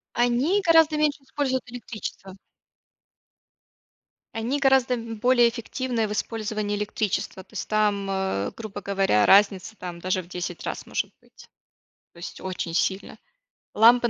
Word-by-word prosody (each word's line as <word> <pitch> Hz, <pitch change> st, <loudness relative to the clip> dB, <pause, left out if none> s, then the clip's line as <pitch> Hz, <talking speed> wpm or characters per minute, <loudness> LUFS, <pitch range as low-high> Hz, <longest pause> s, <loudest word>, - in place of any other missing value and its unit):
Они 245 Hz, +11 st, +2 dB
гораздо 325 Hz, -3 st, +5 dB
меньше 300 Hz, -2 st, +1 dB
используют 265 Hz, -2 st, -2 dB
электричества. 215 Hz, -5 st, -7 dB, 2.0 s
Они 235 Hz, +6 st, -1 dB
гораздо 265 Hz, -2 st, +3 dB
б 230 Hz, -1 st, -6 dB
более 240 Hz, +2 st, +4 dB
эффективны 235 Hz, 0 st, -2 dB
в -, -, -5 dB
использовании 215 Hz, -1 st, -2 dB
электричества. 205 Hz, -2 st, -2 dB
То -, -, -25 dB
есть -, -, -5 dB
там, 210 Hz, -2 st, +1 dB
э, 190 Hz, -, -1 dB
грубо 220 Hz, -3 st, -7 dB
говоря 195 Hz, -, +2 dB
разница, 200 Hz, +1 st, +4 dB
там, 175 Hz, -1 st, -7 dB
даже 185 Hz, +1 st, 0 dB
в 170 Hz, -, -16 dB
10 175 Hz, -1 st, -5 dB
раз -, -, -4 dB
может -, -, -2 dB
быть, -, -, -18 dB, 0.7 s
то -, -, -18 dB
есть 170 Hz, -, -8 dB
очень 180 Hz, -3 st, -4 dB
сильно. 190 Hz, +3 st, -1 dB, 0.6 s
Лампы 240 Hz, +2 st, +6 dB
220 Hz, 135 wpm, -25 LUFS, 195-250 Hz, 2.0 s, Лампы